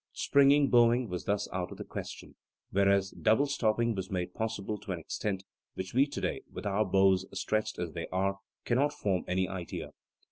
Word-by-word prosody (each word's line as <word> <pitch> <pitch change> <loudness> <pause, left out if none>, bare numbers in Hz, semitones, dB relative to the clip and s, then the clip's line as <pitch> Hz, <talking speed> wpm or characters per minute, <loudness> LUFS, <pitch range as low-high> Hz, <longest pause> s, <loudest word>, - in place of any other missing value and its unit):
"Springing" 140 0 +4
bowing 120 0 +5
was 90 -1 -4
thus 100 0 0
out 90 -1 -2
of - - -8
the - - -5
question, - - -7 0.4
whereas 100 0 +3
double 110 +6 +3
stopping 115 -4 +1
was 95 -2 -4
made 90 -2 -3
possible 110 -2 -3
to 105 -1 -7
an 90 - -2
extent 95 +4 -3 0.3
which 95 0 -5
we 135 +4 +4
today, 140 - -3
with - - -7
our 100 +1 +2
bows 95 0 +4 0.2
stretched 110 +2 -1
as 85 -2 -3
they 85 0 -5
are, 95 +1 -1 0.3
cannot 140 +5 +2
form 95 -4 -1
any 95 0 +1
idea. 95 -2 -6
100 Hz, 180 wpm, -30 LUFS, 95-115 Hz, 0.4 s, bowing